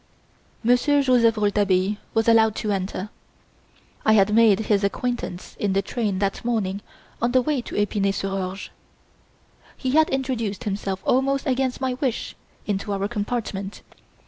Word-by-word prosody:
Monsieur 265 +5 +3
Joseph 235 -4 +4
Rouletabille 205 -1 +1 0.2
was 225 0 +2
allowed 220 -2 +5
to 210 - -2
enter. 195 +1 -3 0.9
I 220 - +4
had 210 0 +4
made 220 -2 +5
his 210 -2 +1
acquaintance 200 -2 -3
in 200 -2 0
the 195 +1 +1
train 210 -2 -2
that 195 0 -1
morning 205 -5 -1 0.4
on 240 +1 +1
the 255 - +5
way 295 -3 0
to - - -8
Epinay 205 -1 +1
sur 195 0 -3
Orge. 195 0 -4 1.1
He 260 - -2
had 315 +3 +4
introduced 250 -5 -2
himself 195 -2 -3
almost 275 +2 +1
against 260 -1 0
my 260 -1 0
wish 255 -2 -3 0.3
into 205 0 -2
our 200 0 -1
compartment. 205 -3 -4
215 Hz, 145 wpm, -23 LUFS, 195-245 Hz, 1.1 s, allowed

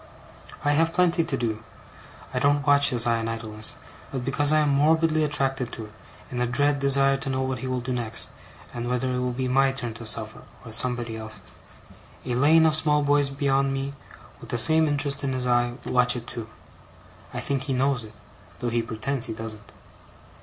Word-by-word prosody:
I 145 - +3
have 165 +3 +1
plenty 175 -2 +3
to 165 - -3
do. 110 -2 -3 0.7
I 125 - 0
don't 145 +1 +2
watch 140 0 +5
his 120 -2 +1
eye 115 -1 +1
in 115 - -3
idleness, 110 -1 -1 0.4
but 130 -2 -4
because 145 +2 +1
I 155 0 +4
am 150 - +2
morbidly 155 +2 +3
attracted 135 -4 0
to 110 - -6
it, 105 - -15 0.4
in 125 -1 -3
a 125 - +1
dread 145 +3 +2
desire 135 0 +3
to 135 - -5
know 130 0 -1
what 130 -2 -3
he 130 - -5
will 130 -1 -2
do 125 +1 -3
next, 115 -3 0 0.4
and 120 0 -4
whether 125 +1 -1
it 125 - -1
will 125 0 -1
be 130 +1 -3
my 135 +1 +3
turn 120 -4 -5
to 115 0 -9
suffer, 110 0 -6 0.2
or 115 - -8
somebody 120 -1 +2
else's. 110 0 -10 0.7
A 125 - -2
lane 155 +6 +5
of 160 - +3
small 150 -1 +3
boys 145 -1 +2
beyond 140 0 0
me, 135 +1 -4 0.5
with - - -12
the 120 - -1
same 160 +6 +6
interest 145 -1 0
in 135 -1 -1
his 130 -1 -2
eye, 120 -1 +1
watch 125 0 +2
it 120 -1 -6
too. 115 -2 -6 0.8
I - - -5
think 135 -1 -2
he 135 - -2
knows 130 -1 0
it, 110 0 -12 0.5
though 120 - -2
he 115 0 0
pretends 115 +3 -3
he 110 - -4
don't. 110 -1 -8
130 Hz, 205 wpm, -25 LUFS, 120-145 Hz, 0.8 s, same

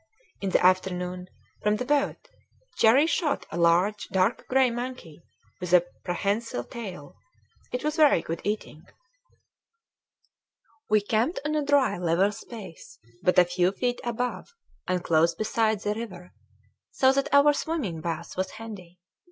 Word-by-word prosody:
In 195 - -1
the 180 - +2
afternoon, 180 -1 +1 0.3
from 210 0 +2
the 250 - -3
boat, 285 +1 0 0.5
Cherrie 255 +7 +5
shot 320 -2 0
a - - -4
large 175 +5 +2
dark 190 +4 0
gray 260 -1 +3
monkey 240 -10 -6 0.4
with 180 -1 -4
a 175 -1 +6 0.2
prehensile 200 - -2
tail. 185 - -8 0.6
It 250 - -3
was 305 +2 -1
very 295 - +5
good 165 0 -5
eating. 205 -7 -4 2.1
We 215 0 +4
camped 225 - 0
on 300 - -1
a 305 -1 +1
dry 280 -9 +2
level 180 +3 +2
space, 205 -5 -11 0.2
but 180 - +2
a 180 - +7
few 180 +1 +1
feet 245 +3 -2
above, 240 0 -4 0.3
and 180 -1 -1
close 165 0 +3
beside, 215 +1 0
the 210 - -1
river 185 -6 -8 0.6
so 260 -1 +3
that 275 0 -1
our 280 +1 +6
swimming 285 - -3
bath 170 0 -5
was 185 0 -2
handy. 200 -6 -10
205 Hz, 145 wpm, -26 LUFS, 180-250 Hz, 2.1 s, a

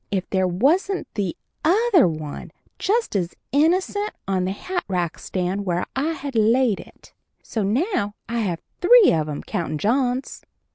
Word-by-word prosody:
if 195 -2 -2
there 190 -1 +2
wasn't 310 - +1
the 200 -5 -2 0.3
other 380 - +4
one, 155 -3 -5 0.3
just 450 - 0
as 180 -3 -1 0.2
innocent, 370 +8 +2 0.2
on 190 -2 0
the 185 - -1
hatrack 195 - -3
stand 185 +2 -2
where 175 -2 -1
I 300 +5 0
had 280 -2 -6
laid 230 0 +3
it. - - -15 0.3
So 225 - -3
now 210 - 0
I 235 +1 -2
have 180 -7 -2 0.2
three 470 +3 +7
of 155 -1 0
'em, 145 - -5
countin' 170 -6 -3
John's. 250 - 0
220 Hz, 150 wpm, -23 LUFS, -, 0.3 s, three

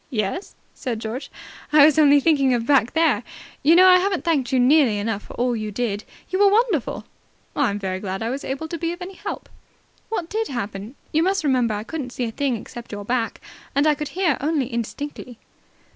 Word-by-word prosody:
"Yes?" 215 - -3 0.2
said 245 -4 -4
George. 225 +5 -5 0.4
"I 300 -1 +8
was 310 0 +4
only 290 -1 +6
thinking 275 -4 +3
of 230 -1 -2
back 265 -3 +3
there. 325 0 +3 0.4
You 315 +4 +5
know, 370 +1 +8
I 365 0 +7
haven't 380 0 -1
thanked 285 -6 +1
you 260 - +3
nearly 255 -3 +4
enough 205 0 -2
for - - -12
all 245 0 0
you 215 -1 -3
did. 210 -1 -3 0.3
You 375 - 0
were 405 0 +6
wonderful." 420 - +1 0.5
"I'm 235 -8 +1
very 190 -2 -3
glad 190 +1 -4
I 230 - -2
was 275 +2 -4
able 275 +4 -4
to 335 - -5
be 335 +1 -1
of 350 - -11
any 380 +2 -8
help." - - -6 0.6
"What 360 -7 -3
did 440 +4 -2
happen? 215 -1 -5 0.2
You 315 - +2
must 385 +1 +1
remember 250 -6 +2
I 205 - -4
couldn't 255 -1 -6
see 250 - -3
a 225 - -4
thing 270 -1 -1
except 235 +2 -10
your 205 -1 -6
back, 235 0 -2 0.3
and 280 +2 +3
I 305 - +5
could 300 0 -5 0.3
only 295 -2 0
hear - - -9
indistinctly." 245 +1 -5
270 Hz, 210 wpm, -22 LUFS, 230-320 Hz, 0.6 s, I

